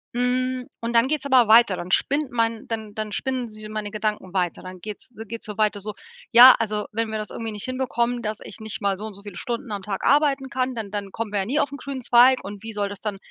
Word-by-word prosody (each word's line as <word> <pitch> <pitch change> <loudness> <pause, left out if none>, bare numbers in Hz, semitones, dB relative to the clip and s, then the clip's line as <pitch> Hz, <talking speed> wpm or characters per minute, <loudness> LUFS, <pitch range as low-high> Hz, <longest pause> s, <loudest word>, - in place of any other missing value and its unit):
Hm, 255 +1 0 0.2
und 230 +1 -3
dann 230 +2 +5
geht's 290 -1 -1
aber 255 -4 +5
weiter. 220 -3 +6
Dann 175 +1 -6
spinnt 280 +6 +1
mein 230 -1 -1
dann 220 -2 -5
dann 215 -1 -4
spinnen 255 +3 -2
s 215 - -12
meine 215 -1 -4
Gedanken 210 -3 -3
weiter. 180 -3 -1
Dann 185 0 -9
geht's 210 +3 -8
äh, 225 - -6
geht's 230 0 -7
so 210 - -6
weiter, 210 -1 +1
so: 210 +1 -5 0.4
„Ja, 245 +2 +10
also, 210 -2 -2
wenn 225 0 -2
wir 220 - -2
das 215 - -5
irgendwie 225 -1 -5
nicht 210 -1 -4
hinbekommen, 245 -2 -1
dass 215 0 -3
ich - - -9
nicht 220 0 -6
mal 200 -1 +1
so 210 - -6
und 220 - -7
so 200 - -13
viele 200 -3 -9
Stunden 240 -1 -4
am 200 -2 -4
Tag 195 -1 -4
arbeiten 280 -1 +3
kann, 255 0 -1
dann 220 -3 -5
dann 205 -2 -4
kommen 225 0 -4
wir 205 - 0
ja 190 - -3
nie 285 +7 0
auf 285 - 0
'n 285 - -6
grünen 275 -2 -6
Zweig. 245 +2 +5
Und 200 +1 -8
wie 225 -1 -6
soll 205 -1 -1
das 200 0 -8
dann 210 -2 -3
225 Hz, 265 wpm, -24 LUFS, 210-250 Hz, 0.4 s, Ja